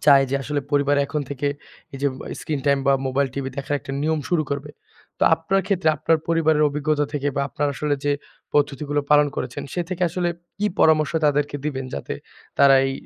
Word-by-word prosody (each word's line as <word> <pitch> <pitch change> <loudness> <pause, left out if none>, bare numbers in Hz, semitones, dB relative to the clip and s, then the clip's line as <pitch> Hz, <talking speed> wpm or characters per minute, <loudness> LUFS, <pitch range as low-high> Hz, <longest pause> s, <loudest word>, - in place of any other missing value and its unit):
চায় 140 -2 +7
যে - - 0
আসলে 145 +1 -2
পরিবার 145 0 +3
এখন 150 +1 -2
থেকে 140 +1 -2 0.5
এই - - -6
যে - - +3
মোবা - - -9
স্ক্রিন 150 -3 -3
টাইম 140 0 +4
বা 140 - +6
মোবাইল, 135 +1 +1
টিভি 135 -1 -3
দেখার 140 +1 -2
একটা 135 - -8
নিয়ম 155 0 +1
শুরু 170 -3 +2
করবে। 140 +1 -3 0.5
তো - - -4
আপনার 175 +4 0
ক্ষেত্রে 185 -5 +1
আপনার 160 +2 +2
পরিবারের 160 -2 +3
অভিজ্ঞতা 150 +1 0
থেকে 145 -1 -1
বা 140 - +2
আপনার 145 +4 -1
আসলে 145 0 0
যে 145 - +2 0.4
পদ্ধতিগুলো 145 0 +1
পালন 150 0 +6
করেছেন, 125 -1 -4
সে 175 - 0
থেকে 185 -1 -3
আসলে 175 +1 -1 0.3
কী 210 - +1
পরামর্শ 155 0 +4
তাদেরকে 145 0 +1
দিবেন 135 -3 -2
যাতে 70 - -4 0.4
তারা 140 -1 +7
এই 135 - -1
145 Hz, 200 wpm, -23 LUFS, 140-155 Hz, 0.5 s, চায়